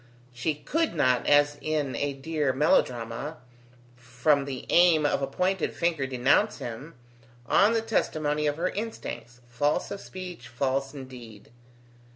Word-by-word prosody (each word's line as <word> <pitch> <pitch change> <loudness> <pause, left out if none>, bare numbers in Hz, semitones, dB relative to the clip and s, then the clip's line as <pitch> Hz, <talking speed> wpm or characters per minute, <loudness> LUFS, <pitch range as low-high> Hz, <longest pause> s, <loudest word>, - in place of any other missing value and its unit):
She 125 +6 -1
could 315 - -1
not, 130 -5 +2
as 145 0 +4
in 150 -3 -1
a 145 0 -1
dear 145 0 -1
melodrama, 130 0 0 0.6
from 125 +4 +1
the 135 -3 -6
aim 170 -3 +5
of 145 - +1
a 135 - 0
pointed 180 +7 -1
finger 165 -5 0
denounce 135 - +2
him, 125 +7 -7 0.5
on 205 - +4
the 225 -1 +1
testimony 150 -9 0
of 145 0 -1
her 180 +2 0
instincts, 125 - -6
false 145 +5 0
of 200 - -5
speech, 180 -9 -8
false 135 +3 -2
in 135 -2 -7
deed. 115 -6 -12
145 Hz, 145 wpm, -27 LUFS, 125-165 Hz, 0.6 s, aim